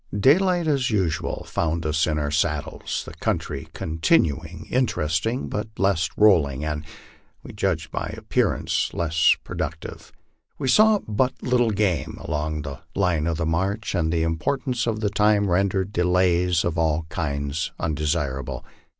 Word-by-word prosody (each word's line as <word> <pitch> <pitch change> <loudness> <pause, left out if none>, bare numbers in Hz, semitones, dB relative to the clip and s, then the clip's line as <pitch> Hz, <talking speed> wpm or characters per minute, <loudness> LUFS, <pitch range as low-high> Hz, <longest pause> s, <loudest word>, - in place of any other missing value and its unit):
Daylight 175 - +4
as 140 -5 +1
usual 95 -8 -1
found 85 0 -2
us 80 +2 +1
in 75 -1 0
our 75 -1 -1
saddles, 75 - -1
the - - -9
country 70 +3 -3
continuing 80 - 0
interest 100 - 0
ing 125 +4 -2
but 105 0 -3
less 95 -4 +2
rolling, 75 -10 +4
and 75 -1 -3 0.6
(we - - -10
judge - - -1
by - - -3
appearances) - - 0
less 80 -1 +3
productive. - - -6 0.5
We 135 -3 -2
saw 215 - +6
but 120 +5 +1
little 125 -2 +2
game 100 -5 0
along 75 0 -3
our 70 0 -7
line 90 -5 +1
of 80 -1 -1
march, 95 +7 -1
and 80 -2 0
the 80 -1 +1
importance 120 - -1
of 110 -2 -1
time 105 -1 +3
rendered 95 +2 +1
delays 90 -1 +2
of 85 0 -1
all 80 0 +1
kinds 70 -1 -2
undesirable. 75 -4 -2
85 Hz, 140 wpm, -24 LUFS, 80-105 Hz, 0.6 s, saw